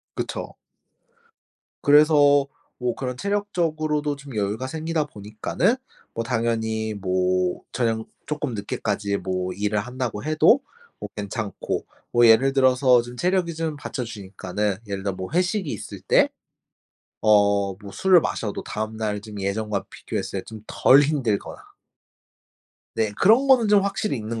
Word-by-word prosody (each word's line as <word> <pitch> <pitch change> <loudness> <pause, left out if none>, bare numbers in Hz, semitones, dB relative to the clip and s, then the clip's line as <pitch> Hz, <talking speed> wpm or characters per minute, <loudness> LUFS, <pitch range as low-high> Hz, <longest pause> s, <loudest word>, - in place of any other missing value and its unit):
그쵸. - - -4 1.3
그래서 145 -1 +5 0.3
뭐 125 -1 -1
그런 125 -2 -4
체력적으로도 155 -6 -1
좀 140 -3 -11
여유가 105 +5 -1
생기다 160 +2 -2
보니까는 110 - -1 0.4
뭐 115 - -2
당연히 110 -2 -1
뭐 90 -2 0
저녁 115 -2 -1 0.2
쪼끔 150 -5 -3
늦게까지 100 -1 -2
뭐 90 0 -3
일을 105 +2 -1
한다고 125 0 -4
해도 155 - +4 0.4
뭐 - - -6
괜찮고. 105 0 -4 0.3
뭐 120 0 +6
예를 115 +5 +6
들어서 130 -2 +4
좀 120 +1 -10
체력이 180 +2 0
좀 160 -1 -3
받쳐주니까는 105 -6 -4
예를 100 -1 -4
들어 100 -2 -1
뭐 95 0 -6
회식이 180 -1 0
있을 - - -7
때 - - +3 1.0
어 100 -2 +4
뭐 100 -1 -9
술을 185 -3 +5
마셔도 105 -8 -3
다음날 110 -1 -3
좀 105 -1 -9
예전과 100 +1 -2
비교했을 - - -4
때 - - -24
좀 110 -1 -10
덜 135 +2 +5
힘들거나 140 -8 -1 1.4
네. 110 -2 0
그런 235 +7 +5
거는 250 -5 +5
좀 205 -1 +5
확실히 200 -3 -1
있는 115 0 -4
115 Hz, 280 characters per minute, -24 LUFS, 105-150 Hz, 1.4 s, 뭐